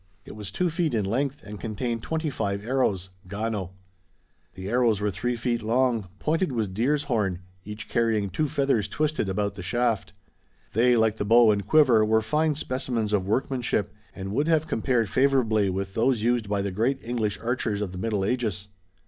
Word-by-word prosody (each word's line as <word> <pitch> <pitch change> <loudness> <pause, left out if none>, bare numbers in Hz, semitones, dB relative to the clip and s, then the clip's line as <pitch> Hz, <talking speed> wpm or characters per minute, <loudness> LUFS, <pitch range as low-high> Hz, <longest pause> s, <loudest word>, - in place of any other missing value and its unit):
It - - -10
was 105 -2 -6
two 175 - 0
feet 165 -5 0
in 105 -3 0
length 135 +7 -1
and 105 0 -8
contained 115 +1 -3
twenty 160 +1 -2
five 100 -4 -2
arrows, 105 -8 0 0.2
gano. 100 -2 -3 0.8
The 95 0 -7
arrows 115 -2 +2
were 105 0 0
three 120 +7 -2
feet 120 0 -1
long, 115 -3 +1
pointed 160 - 0
with 110 -6 -2
deer's 140 +8 +1
horn, 105 -10 -1 0.2
each 105 +1 -7
carrying 110 -4 +1
two 155 - 0
feathers 135 -8 +1
twisted 155 -9 -1
about 100 +1 -1
the 100 - -8
shaft. 110 0 0 0.6
They, 120 +2 +4
like 110 -1 +2
the - - -1
bow 115 +1 +6
and 100 -2 -1
quiver, 130 -7 +5
were 110 +1 +2
fine 150 +7 +1
specimens 125 -6 -2
of 95 -2 +1
workmanship 115 -3 0 0.2
and 95 0 -5
would 145 +7 +1
have 160 -2 +3
compared 120 -5 0
favorably 120 -6 +2
with 95 +1 -3
those 115 0 +1
used 120 -3 +1
by 100 -1 0
the 100 - -2
great 115 +8 +1
English 115 -3 -1
archers 115 -3 -1
of 105 -3 -3
the 90 - -7
Middle 105 -2 -1
Ages. 105 -4 -2
115 Hz, 180 wpm, -26 LUFS, 100-130 Hz, 0.8 s, bow